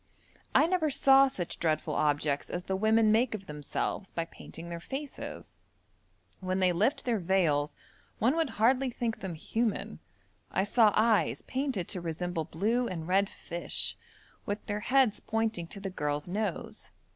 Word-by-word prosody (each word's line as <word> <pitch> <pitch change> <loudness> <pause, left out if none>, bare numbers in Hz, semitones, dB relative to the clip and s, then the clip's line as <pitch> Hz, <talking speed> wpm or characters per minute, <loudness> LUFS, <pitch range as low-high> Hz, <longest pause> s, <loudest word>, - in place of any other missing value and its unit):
I - - +7
never 335 -3 +1
saw 270 0 +6
such 180 -9 -4
dreadful 155 -2 0
objects 145 -1 +1
as 175 - -3
the 190 - -2
women 220 +2 +4
make 225 +1 +3
of 195 -2 -8
themselves 150 +5 -3
by 165 - -3
painting 165 0 -10
their 170 0 -5
faces. 275 - -7 0.9
When 185 0 -1
they 185 -1 +3
lift 240 - +1
their 235 -4 +1
veils 165 -6 +1 0.4
one 245 +7 +2
would 325 -3 +1
hardly 255 +4 +3
think 235 -2 -3
them 185 -4 -5
human. 225 +7 -2 0.5
I 190 - +1
saw 215 +1 +5
eyes 220 -1 +3
painted 260 -9 -2
to 180 - -2
resemble 170 0 -3
blue 220 +10 0
and 165 -5 -5
red 195 +2 +3
fish, 170 0 -2 0.5
with 205 0 -4
their 205 -1 -2
heads 250 0 +3
pointing 225 -6 -1
to 200 - -7
the 195 -1 -5
girl's 150 -3 -2
nose. 200 0 -3
200 Hz, 155 wpm, -30 LUFS, 170-235 Hz, 0.9 s, I